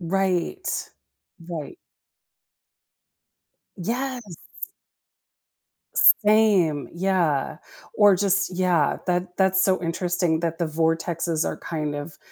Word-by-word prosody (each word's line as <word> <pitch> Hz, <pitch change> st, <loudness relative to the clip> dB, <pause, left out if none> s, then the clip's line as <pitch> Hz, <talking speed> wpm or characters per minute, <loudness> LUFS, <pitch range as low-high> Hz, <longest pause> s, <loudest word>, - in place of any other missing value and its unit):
Right. 190 Hz, -, -2 dB, 0.6 s
Right. 155 Hz, -5 st, -6 dB, 2.0 s
Yes. 250 Hz, +6 st, -3 dB, 1.7 s
Same. 205 Hz, -, +4 dB
Yeah. 170 Hz, -6 st, 0 dB, 0.4 s
Or 205 Hz, -2 st, +5 dB
just 195 Hz, 0 st, +1 dB
Yeah, 180 Hz, -5 st, +1 dB
that 180 Hz, 0 st, -2 dB
that's 190 Hz, 0 st, +3 dB
so 185 Hz, -2 st, +1 dB
interesting 175 Hz, -1 st, -1 dB
that 165 Hz, -1 st, -2 dB
the 170 Hz, -, -1 dB
vortexes 165 Hz, +1 st, -1 dB
are -, -, -3 dB
kind 150 Hz, -3 st, -4 dB
of 145 Hz, +2 st, -7 dB
175 Hz, 90 wpm, -24 LUFS, 165-195 Hz, 2.0 s, Or